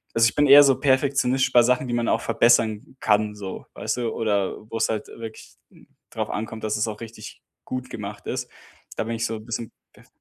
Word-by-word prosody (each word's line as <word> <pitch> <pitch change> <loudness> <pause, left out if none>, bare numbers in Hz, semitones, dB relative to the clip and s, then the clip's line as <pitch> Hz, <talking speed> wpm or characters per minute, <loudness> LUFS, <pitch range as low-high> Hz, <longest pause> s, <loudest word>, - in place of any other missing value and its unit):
also 115 0 +5
ich - - -14
bin 145 - +4
eher 145 +1 +10
so 135 -2 +3
perfektionistisch 130 -2 +2
bei 120 - +7
Sachen, 125 +1 +1
die 120 - -3
man 120 -1 0
auch - - +1
verbessern 115 +1 +2
kann 105 0 +1
so, 100 -2 -7
weißt - - -2
du? 120 -2 -1
Oder 100 -4 0
wo's 115 0 0
halt 110 -1 -3
wirklich 115 -1 -10 0.2
n - - -20 0.2
drauf - - -3
ankommt, 110 +1 -5
dass 110 - -1
es 110 +1 0
auch 105 0 -6
richtig 115 -2 -10 0.2
gut 130 0 -5
gemacht 100 -1 -7
ist, - - -3 0.5
da - - -1
bin 115 - -3
ich 115 +1 -2
so 115 - -4
'n 110 - -12
bisschen 115 0 -5 0.2
perf - - -21
115 Hz, 215 wpm, -24 LUFS, 110-125 Hz, 0.5 s, eher